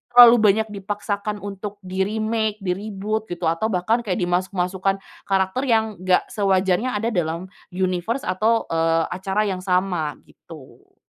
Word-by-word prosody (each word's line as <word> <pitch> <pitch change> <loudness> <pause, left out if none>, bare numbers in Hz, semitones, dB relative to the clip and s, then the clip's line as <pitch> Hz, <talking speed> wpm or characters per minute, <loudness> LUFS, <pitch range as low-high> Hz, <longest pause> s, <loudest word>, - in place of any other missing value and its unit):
terlalu 240 -1 +10
banyak 215 +1 +3
dipaksakan 205 0 -4
untuk 205 0 -6
di-remake, 215 +3 -1
di-reboot 205 +3 -3
gitu 175 0 -7
atau 165 +7 -1
bahkan 220 +3 +1
kayak 205 -6 -2
dimasuk-masukan 185 +1 0 0.3
karakter 195 +7 0
yang 220 -5 +1
enggak 185 0 +2
sewajarnya 195 +3 +1
ada 225 +3 -1
dalam 175 0 -2 0.2
universe 185 +7 -1
atau, 215 +5 +1
eee, 165 0 +2
acara 190 +3 -1
yang 190 -3 -2
sama 180 -4 0
gitu. 155 -6 -16
195 Hz, 130 wpm, -22 LUFS, 180-215 Hz, 0.3 s, terlalu